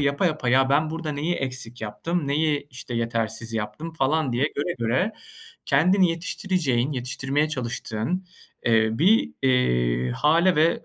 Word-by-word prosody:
yapa 140 +5 +1
yapa, 155 -6 -1
"Ya, 130 +2 +4
ben 155 +2 +2
burada 160 -2 -4
neyi 155 +5 -1
eksik 130 -3 -4
yaptım, 140 +9 -3
neyi, 150 0 +1
işte, 125 -1 -7
yetersiz 115 -1 -2
yaptım?" 110 +10 -4
falan 155 -2 0
diye 125 +4 +1
göre 170 +5 -1
göre 130 - 0 0.5
kendini 180 +6 +4
yetiştireceğin 165 -6 -1
yetiştirmeye 135 +3 -1
çalıştığın, 125 - -3 0.4
eee, 110 -2 +4
bir, 185 - +3
eee, 60 - +2
hâle 165 - +3
ve 160 +2 +2
140 Hz, 140 wpm, -24 LUFS, 120-160 Hz, 0.5 s, Ya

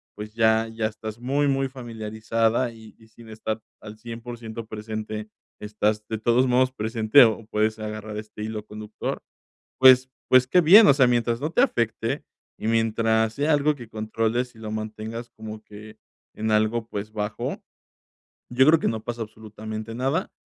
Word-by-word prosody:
pues, 105 0 -8
ya 110 0 +3
ya 115 -1 -3
estás 110 +1 -8
muy, 140 +4 +1
muy 135 0 +1
familiarizada 115 -1 -2
y 110 -1 -15
y 110 - -20
sin 115 +1 -16
estar 110 0 -4 0.2
al 105 +1 -10
100 115 +1 -8
por 120 0 -7
ciento 115 0 -7
presente, 110 0 -6 0.3
estás 105 0 -1
de 110 - -3
todos 120 +4 +2
modos 130 +1 +3
presente 110 +2 +4
o 110 -1 -1
puedes 110 0 0
agarrar 110 0 -6
este 105 0 -8
hilo 110 -1 -5
conductor, 105 0 -6 0.6
pues 130 0 +7 0.2
pues, 130 0 +5
qué 180 - +4
bien, 200 +6 +8
o - - +7
sea, 130 -2 +4
mientras 120 -1 +1
no 150 +4 -3
te 245 - +3
afecte 115 - 0 0.3
y - - -3
mientras 110 0 +1
sea 150 +2 +1
algo 150 +1 +3
que 120 -5 -11
controles 115 +3 -2
y 110 - -16
lo 110 - -6
mantengas 110 +2 -6
como 110 0 -9
que 105 +1 -13 0.4
en 110 0 -2
algo, 110 +2 +1
pues, 105 +1 -6
bajo, 105 0 -4 0.9
yo 130 +2 +3
creo 155 +1 +6
que - - +1
no 110 -1 -4
pasa 120 -1 -5
absolutamente 110 0 -8
nada, 135 - -1
110 Hz, 175 wpm, -24 LUFS, 110-120 Hz, 0.9 s, bien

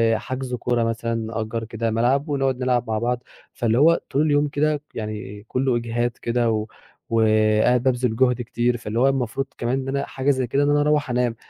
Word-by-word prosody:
حجز 130 +1 -4
كورة 120 -1 0
مثلًا، 115 0 -1
نأجّر 115 0 -3
كده 115 0 -3
ملعب، 130 +7 +1
ونقعد 135 -2 0
نلعب 125 -1 +1
مع 110 -1 -1
بعض، 125 +1 -1 0.3
فاللي 115 0 0
هو 165 +3 +5
طول 140 - +1
اليوم 150 -1 +2
كده 150 0 0
يعني 105 -1 -6
كلّه 130 -1 0
إجهاد 120 +1 -1
كده 120 -1 +1
و 110 -1 -1 0.4
وقاعد 110 +2 +3
بابذل 125 -3 +1
جُهد 125 0 +2
كتير 120 0 0
فاللي 115 0 -3
هو 130 - +4
المفروض 135 -1 0
كمان 120 +3 -1
إن 135 - -7
أنا 140 +1 -1
حاجة 135 +1 -2
زي 130 -2 -1
كده 140 +5 +1
إن 145 - +2
أنا 145 0 +3
أروّح 150 -2 +1
أنام، 125 -1 0
120 Hz, 195 wpm, -23 LUFS, 115-135 Hz, 0.4 s, هو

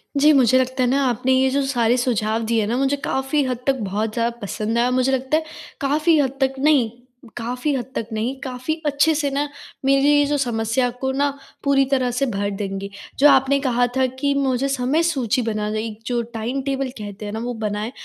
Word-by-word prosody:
जी, 290 +2 +5
मुझे 255 -3 +5
लगता 260 +1 -1
है 245 - +2
ना 275 +2 +2
आपने 250 +2 0
ये 260 0 +3
जो 280 +2 +1
सारे 245 -3 +2
सुझाव 225 -2 0
दिए 225 -1 +1
न 225 - -1
मुझे 275 +1 +1
काफ़ी 270 +2 0
हद 255 -1 -2
तक 270 - +4
बहुत 210 +2 -2
ज़्यादा 235 0 -1
पसंद 215 +3 -2
आया। 245 +1 +2
मुझे 255 +1 +2
लगता 265 +3 +1
है 320 - -2 0.4
काफ़ी 305 +4 +3
हद 270 -3 +2
तक 265 0 +2
नहीं, 280 -5 +3 0.5
काफ़ी 250 +5 -2
हद 250 -3 -2
तक 225 - -2
नहीं, 225 +5 -2
काफ़ी 255 +3 -3
अच्छे 295 +2 +3
से 290 -1 0
ना 285 +2 0 0.4
मेरी 275 +1 +4
ये 290 0 +5
जो 290 +1 0
समस्या 240 -1 0
को 265 0 0
ना 285 +2 +1 0.3
पूरी 275 -1 +3
तरह 255 -2 +2
से 250 +3 0
भर 200 -5 -2
देंगे। 195 0 -4 0.3
जो 290 - +7
आपने 270 0 +4
कहा 245 -3 +1
था 260 - +3
कि 280 0 +1
मुझे 270 -1 +1
समय 275 +4 +1
सूची 260 -7 0
बनाना 215 -2 -2
एक 215 -1 -4
जो 240 -1 0
टाइम 235 +5 -2
टेबल 270 -1 -2
कहते 210 -1 -7
हैं 205 - -5
न - - -3
वो 245 0 -3
बनाएँ 210 +2 -2
255 Hz, 215 wpm, -21 LUFS, 230-275 Hz, 0.5 s, जो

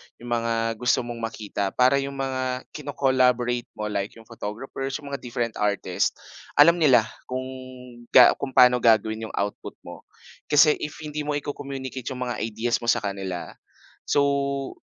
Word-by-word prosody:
yong 120 0 -10
mga 115 -1 0 0.3
gusto 125 0 +2
mong 120 -1 -6
makita 110 -3 -4
para 130 +2 +4
yong 140 0 -4
mga 130 -1 -2
kino-collaborate 130 -4 +1
mo, 105 0 -4
like 100 0 -3
yong 115 - -14
photographers, 120 +5 -6
yong 145 -2 -7
mga 140 - -3
different 120 -2 -4
artist, 100 -3 0 0.4
alam 170 +4 +6
nila, 130 -8 +6 0.2
kung, 130 0 -3 0.7
ga 125 - +10
kung 130 -2 -5
pa'no 125 0 +7
gagawin 110 -1 +2
yong - - -9
output 100 +1 -3
mo. - - -11 0.4
Kasi 150 +1 +5
if 150 - -5
hindi 150 0 -5
mo 145 - 0
i-co-communicate 135 -3 -5
yong 130 -2 -3
mga - - -4
ideas 115 +2 -1
mo 120 - -7
sa - - +2
kanila, 95 -3 -4 0.6
so, 140 -1 0
125 Hz, 155 wpm, -25 LUFS, 115-140 Hz, 0.7 s, ga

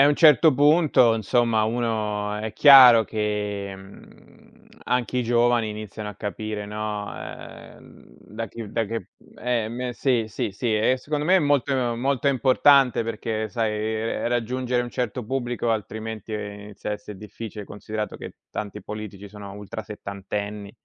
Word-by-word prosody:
e - - +9
a - - +7
un 145 - +4
certo 155 0 +6
punto, 145 -4 +4
insomma 115 0 +1
uno 110 -3 -1
è 105 +1 -4
chiaro 130 -5 +9
che, 105 -2 -3
mhmm, 95 +1 -17 0.2
anche 125 0 -1
i 125 - +2
giovani 120 -1 +2
iniziano 105 0 -7
a - - -12
capire, 105 +1 -5
no, 105 0 -4
ehm, - - -11 0.2
da 115 +2 -7
chi 110 0 -8
da 115 - 0
che 110 -2 -5
mhmm, - - -22
eh, 120 -3 -1
me 125 +1 -4
sì, 120 -4 +1
sì, 105 - -3
sì, 110 +2 -1
e 125 +4 +2
secondo 150 +3 -3
me 185 +4 +5
è - - +5
molto 145 -3 +1 0.2
molto 135 +2 0
importante 135 -1 +4
perché, 110 -1 -3
sai, 110 +1 -1 0.5
ehm, - - -1
raggiungere 125 +1 -1
un 120 - -6
certo 125 -1 -3
pubblico 120 -1 -2
altrimenti 110 0 -4
inizia 105 0 -6
a - - 0
esse' 105 0 -8
difficile, 105 +1 -8
considerato 105 +1 -6
che - - -9 0.2
tanti 105 0 -6
politici 105 -2 -7
sono 100 -1 -10
ultrasettantenni, 100 0 -6
110 Hz, 155 wpm, -24 LUFS, 105-125 Hz, 0.5 s, e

